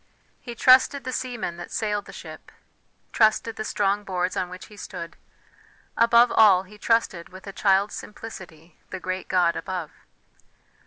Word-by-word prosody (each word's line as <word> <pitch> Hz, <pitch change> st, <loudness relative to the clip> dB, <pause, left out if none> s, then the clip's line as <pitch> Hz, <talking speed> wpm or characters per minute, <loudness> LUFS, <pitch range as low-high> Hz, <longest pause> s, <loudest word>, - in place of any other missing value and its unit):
He 240 Hz, -2 st, -8 dB
trusted 260 Hz, +3 st, +5 dB
the 255 Hz, -, -4 dB
seaman 240 Hz, -10 st, -4 dB
that 175 Hz, -, -8 dB
sailed 210 Hz, -2 st, -2 dB
the -, -, -11 dB
ship -, -, -11 dB, 0.6 s
trusted 220 Hz, 0 st, +2 dB
the 215 Hz, -, -4 dB
strong 205 Hz, -1 st, 0 dB
boards 185 Hz, -2 st, -2 dB
on 180 Hz, -, -2 dB
which 180 Hz, +1 st, -9 dB
he 210 Hz, -, -15 dB
stood, 180 Hz, -4 st, -8 dB, 0.8 s
above 235 Hz, +1 st, +5 dB
all 195 Hz, -4 st, +6 dB
he 210 Hz, +2 st, -16 dB
trusted 215 Hz, -8 st, 0 dB
with 185 Hz, +1 st, -13 dB
a 195 Hz, -, -8 dB
child's 195 Hz, +1 st, +2 dB
simplicity 175 Hz, -7 st, -10 dB
the 190 Hz, -, -6 dB
great 185 Hz, 0 st, -4 dB
God 175 Hz, -2 st, +2 dB
above. 180 Hz, -5 st, -5 dB
200 Hz, 155 wpm, -24 LUFS, 185-225 Hz, 0.8 s, all